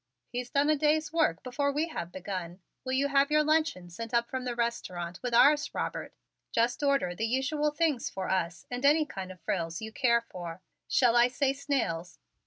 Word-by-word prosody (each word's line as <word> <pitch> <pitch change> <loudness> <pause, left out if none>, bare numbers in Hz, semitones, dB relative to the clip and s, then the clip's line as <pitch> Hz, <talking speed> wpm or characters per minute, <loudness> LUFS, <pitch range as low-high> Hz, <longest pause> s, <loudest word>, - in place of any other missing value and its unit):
"He's 245 0 -4
done 280 +2 +2
a - - +4
day's 305 +1 +1
work 310 - +1
before 280 +3 0
we 305 +4 -1
have 170 - -5
begun. 185 -1 -5 0.2
Will 260 0 -3
you 275 +2 +2
have 280 0 +3
your 305 0 +4
luncheon 305 - +1
sent 230 +6 -5
up 235 0 +1
from 260 -1 -3
the 245 -1 -2
restaurant 180 -7 -3
with 245 - -3
ours, 290 +5 +4
Robert? - - -4 0.4
Just 235 +4 +1
order 275 -10 +2
the 225 +5 -2
usual 285 +5 +1
things 295 -4 0
for 190 - -4
us 175 -2 -1
and 245 +1 -4
any 300 +2 +5
kind 190 -8 -7
of 185 -1 -13
frills 165 -2 -2
you 220 0 -6
care 235 0 +3
for. 175 0 -7 0.2
Shall 240 -3 +3
I 240 0 +6
say 270 +2 0
snails?" 245 - -2
245 Hz, 195 wpm, -29 LUFS, 185-285 Hz, 0.4 s, I